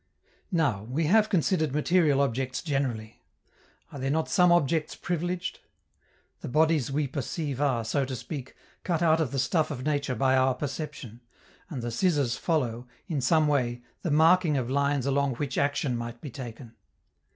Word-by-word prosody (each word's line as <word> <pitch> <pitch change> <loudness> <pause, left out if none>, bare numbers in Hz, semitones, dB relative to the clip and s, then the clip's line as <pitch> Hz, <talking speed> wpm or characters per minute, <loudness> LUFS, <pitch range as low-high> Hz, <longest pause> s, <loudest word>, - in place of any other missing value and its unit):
Now, 140 - +1
we 135 +8 -1
have 215 +6 +4
considered 160 -5 +1
material 150 -2 +3
objects 130 -1 -1
generally. 130 -8 -3 0.7
Are 140 - -8
there 135 +1 -1
not 160 +3 0
some 180 -1 +4
objects 160 -2 +2
privileged? 175 +1 -3 0.8
The - - -7
bodies 155 -1 +2
we 145 +2 0
perceive 140 +1 -4
are, 130 -6 +1
so 140 +5 0
to 130 0 -5
speak, 135 +1 -7 0.3
cut 170 -2 0
out 160 -1 +4
of 145 -6 -1
the 140 - -3
stuff 150 +4 +1
of 135 -4 -5
nature 145 -3 0
by 130 +3 +2
our 130 0 +3
perception, 130 -4 -6 0.5
and 130 -7 -5
the 120 - -3
scissors 140 -3 +1
follow, 125 -7 -1 0.2
in 155 -7 -2
some 155 +3 +3
way, 120 -4 0 0.2
the 175 - -2
marking 160 +1 +4
of 130 -1 -2
lines 140 -1 +1
along 140 -1 +1
which 140 +2 -3
action 140 -2 0
might 120 0 -5
be 145 - -8
taken. 115 -1 -9
140 Hz, 165 wpm, -27 LUFS, 130-160 Hz, 0.8 s, have